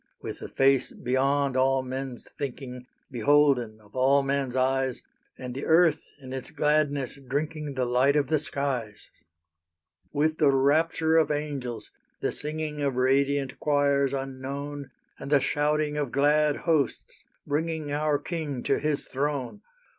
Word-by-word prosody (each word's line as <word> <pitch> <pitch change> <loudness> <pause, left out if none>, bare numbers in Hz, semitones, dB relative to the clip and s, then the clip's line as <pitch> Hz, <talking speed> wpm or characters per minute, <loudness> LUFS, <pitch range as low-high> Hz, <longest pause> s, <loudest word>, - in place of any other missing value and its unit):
With - - -7
the - - -7
Face 135 -1 +3
beyond 135 +2 0
all 130 0 +2
men's 130 -1 -6
thinking, 125 -2 -6 0.2
Beholden 125 -3 +3
of 105 +1 -21
all 135 +2 +4
men's 135 -2 -1
eyes; 130 0 0 0.3
And 125 -1 -6
the 135 - -5
earth 165 -1 +3
in 130 -2 -9
its 130 -1 -5
gladness 150 -3 0
drinking 150 +1 -3
The 130 -1 0
light 125 +4 +3
of 145 -1 +3
the 155 +3 +1
skies. 135 -7 -4 1.0
With 155 +2 0
the 150 - +5
rapture 160 +4 +3
of 160 - +4
angels, 145 -6 -4 0.3
the - - -1
singing 150 0 -4
Of 140 -3 0
radiant 135 +1 +1
choirs 140 -2 +2
unknown, 140 +1 -5 0.3
And - - -7
the 145 -1 +5
shouting 150 +1 0
of 145 -4 -2
glad 150 +1 +3
hosts 155 -6 -1 0.2
bringing 155 0 -2
Our 150 0 +1
King 150 -6 -4
to - - +1
His 150 -1 -1
throne! 140 - -3
140 Hz, 140 wpm, -27 LUFS, 130-150 Hz, 1.0 s, the